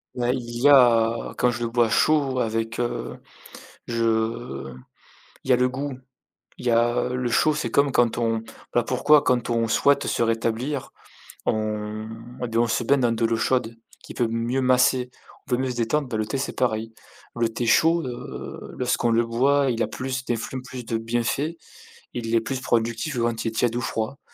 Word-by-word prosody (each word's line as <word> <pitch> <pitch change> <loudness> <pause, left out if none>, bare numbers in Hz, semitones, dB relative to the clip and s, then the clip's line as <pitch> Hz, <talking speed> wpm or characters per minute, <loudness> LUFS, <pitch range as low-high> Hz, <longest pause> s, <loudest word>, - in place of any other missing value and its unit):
Ben 120 -1 0
il 120 -2 -4
y 145 - +6
a 115 -4 +4
quand 125 - +4
je 120 0 -3
le 115 - -1
bois 120 -2 +3
chaud 140 +1 +2
avec, 115 0 -2
heu, 120 0 -3 0.7
je 115 - -1 0.7
il - - -9
y - - +5
a - - +7
le 125 +1 +2
goût, 135 +1 -4 0.6
il - - -8
y - - +4
a 120 +1 +2
le 125 -1 -2
chaud, 150 +7 +3
c'est 135 -6 -2
comme 140 +4 +3
quand 120 -3 +2
on 115 -1 0 0.3
ben 120 - +4
pourquoi 130 +5 +4
quand 125 -4 +1
on 115 -1 +1
souhaite 140 +5 +2
se - - 0
rétablir, 115 +4 -1 0.5
on 110 0 -2 0.3
et 125 - -1
ben 115 0 +1
on 120 - +3
se 115 - 0
baigne 140 +4 +3
dans 120 -2 +2
de 115 0 -1
l'eau 115 0 0
chaude 115 -1 0 0.3
qui - - -10
peut 120 - +1
mieux 115 +3 -1
masser, 125 0 +3 0.4
on - - -14
peut 125 - +3
mieux 130 0 -1
se 125 - -5
détendre, 130 +5 0
ben 115 - -3
le 110 - 0
thé, 135 +6 -3
c'est 140 - -4
pareil. 115 -2 -1 0.4
Le 115 -1 +1
thé 115 +1 -3
chaud, 165 +9 +4
heu, 120 -1 -7
lorsqu'on 125 -1 +1
le 115 +1 +2
boit, 135 +4 +2
il 115 -1 0
a - - +1
plus 130 -1 -4
d'effluves, 120 +2 -3
plus 125 -1 -8
de 115 - -1
bienfaits, 120 +8 -1 0.6
il 115 -1 -2
est 115 - +4
plus 130 +3 -4
productif 115 +4 -1
que - - -1
quand 115 -1 -1
il - - -2
est - - -1
tiède 115 +1 0
ou 120 - -1
froid. 115 +4 -3
120 Hz, 200 wpm, -24 LUFS, 115-130 Hz, 0.7 s, a